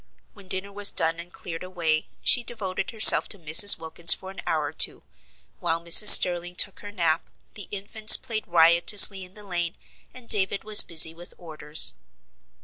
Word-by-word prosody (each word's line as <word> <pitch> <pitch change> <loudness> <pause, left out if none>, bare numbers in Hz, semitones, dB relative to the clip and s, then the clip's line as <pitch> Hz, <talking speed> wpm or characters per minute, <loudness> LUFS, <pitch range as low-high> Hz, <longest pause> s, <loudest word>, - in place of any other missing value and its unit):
When 200 -2 -18
dinner 190 +2 -4
was 205 0 -1
done 165 +1 -5
and 175 +1 -13
cleared 165 -2 -13
away, 170 -4 -6 0.2
she 250 -3 +2
devoted 195 -5 -9
herself 220 -2 +4
to 205 - -4
Mrs. 170 +4 +3
Wilkins 160 0 0
for 190 - -15
an 195 - -14
hour 155 -2 -5
or 145 - -11
two, - - -1 0.6
while 165 0 -5
Mrs. 170 +5 +4
Sterling 175 -2 +5
took 190 - 0
her 205 - -14
nap, 170 -4 -6 0.2
the 205 - -12
infants 210 +2 +1
played 220 -2 -9
riotously 175 +4 +2
in 180 +1 -16
the 210 -1 -15
lane, 175 -3 -7 0.4
and 255 -2 -15
David 195 -2 -3
was 215 -1 +4
busy 160 -1 +1
with 175 +1 -14
orders. 155 -3 0
180 Hz, 175 wpm, -20 LUFS, 165-205 Hz, 0.6 s, Sterling